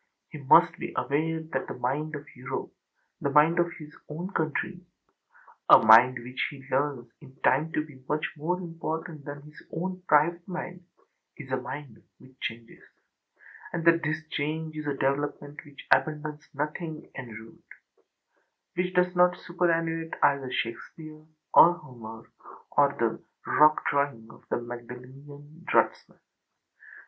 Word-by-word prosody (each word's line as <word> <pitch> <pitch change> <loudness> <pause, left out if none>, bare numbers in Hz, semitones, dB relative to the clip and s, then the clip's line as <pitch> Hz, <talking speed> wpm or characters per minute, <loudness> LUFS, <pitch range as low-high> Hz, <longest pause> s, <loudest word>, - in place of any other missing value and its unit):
He 155 - -9
must 135 - +5
be - - -5
aware 160 +3 -1
that 135 0 -1
the - - -6
mind 145 +5 -2
of 145 0 -8
Europeâthe 125 +2 -5 0.6
mind 155 +4 +5
of 170 0 +2
his 150 -3 -12
own 170 +5 -5
countryâa 175 -6 0
mind 115 +3 +8
which 125 +2 -3
he 135 -2 -12
learns 135 -3 -1
in 135 -3 -15
time 150 +5 +3
to 155 - 0
be 140 -4 -16
much 150 +1 0
more 170 +4 -2
important 165 -2 -5
than 145 0 -7
his 150 +1 -14
own 185 +2 -4
private 170 +4 +3
mindâis 180 -6 -10
a - - +2
mind 130 -1 -8 0.2
which 130 - -18
changes, 115 0 -6 0.9
and 170 -1 -3
that 165 0 +5
this 155 +1 -2
change 155 +2 -3
is 155 -1 -5
a 145 - -1
development 145 +2 -2
which 145 -1 -13
abandons 150 0 +1
nothing 155 +2 -4
en 130 -3 -7
route, 110 +1 -12 1.1
which 180 +1 -2
does 180 0 +2
not 180 0 +5
superannuate 165 -2 -1
either 135 -2 +2
Shakespeare, 155 +7 -5 0.3
or 175 - +9
Homer, 115 -7 -11 0.4
or - - +4
the - - 0 0.2
rock 155 0 +4
drawing 140 -6 -1
of - - -17
the - - +1
Magdalenian 130 +6 -11
draughtsmen. - - +1
150 Hz, 135 wpm, -27 LUFS, 135-165 Hz, 1.1 s, or